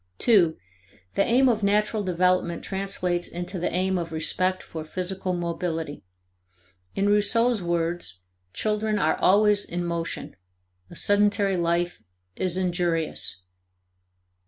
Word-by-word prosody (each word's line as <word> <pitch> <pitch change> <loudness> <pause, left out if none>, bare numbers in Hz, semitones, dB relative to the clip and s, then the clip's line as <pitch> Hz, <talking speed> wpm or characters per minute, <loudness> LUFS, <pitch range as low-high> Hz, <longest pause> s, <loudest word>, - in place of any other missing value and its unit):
(2) 180 -9 +4 0.6
The 200 - +3
aim 255 +5 +4
of 225 -3 +2
natural 210 +2 +1
development 180 -1 +1
translates 185 -3 -2
into 175 +2 -5
the 175 - -1
aim 185 +1 0
of 165 -1 -5
respect 185 +4 0
for 160 -1 -7
physical 185 +3 -3
mobility. 170 -3 -3 0.9
In 200 +1 +1
Rousseau's 210 +2 +3
words: 170 - -2 0.3
"Children 215 - 0
are - - +2
always 205 +1 +4
in 175 0 -4
motion; 170 -1 -4 0.5
a - - -12
sedentary 205 -1 +2
life 175 0 0 0.3
is 185 -1 0
injurious." 170 - -1
185 Hz, 115 wpm, -25 LUFS, 170-205 Hz, 0.9 s, 2